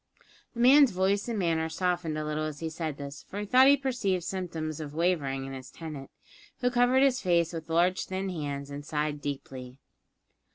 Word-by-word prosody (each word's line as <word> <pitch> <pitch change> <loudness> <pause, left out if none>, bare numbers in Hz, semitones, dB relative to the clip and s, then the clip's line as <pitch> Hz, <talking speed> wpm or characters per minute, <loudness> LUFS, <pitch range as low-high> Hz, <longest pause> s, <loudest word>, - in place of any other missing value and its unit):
The - - -7
man's 275 +2 +7
voice 195 +2 0
and 230 -2 -2
manner 165 -3 0
softened 175 -2 -1
a 155 - -3
little 155 0 -2
as 150 -2 -5
he 160 -1 -4
said 155 -3 -4
this, 140 0 -7
for 200 - -5
he 210 - -3
thought 255 +5 +6
he 285 +1 +7
perceived 230 -10 -1
symptoms 165 -5 -4
of 150 -1 -7
wavering 150 -6 0
in 135 - -7
his 130 0 -8
tenant, 155 -5 -8 0.5
who 250 0 +2
covered 245 +2 +4
his 260 -2 +3
face 170 -2 +2
with 165 -1 -5
his - - -29
large 175 +3 +2
thin 190 +1 -3
hands 145 -5 -4
and 145 +1 -6
sighed 150 0 -2
deeply. 130 -3 -6
165 Hz, 200 wpm, -28 LUFS, 150-195 Hz, 0.5 s, man's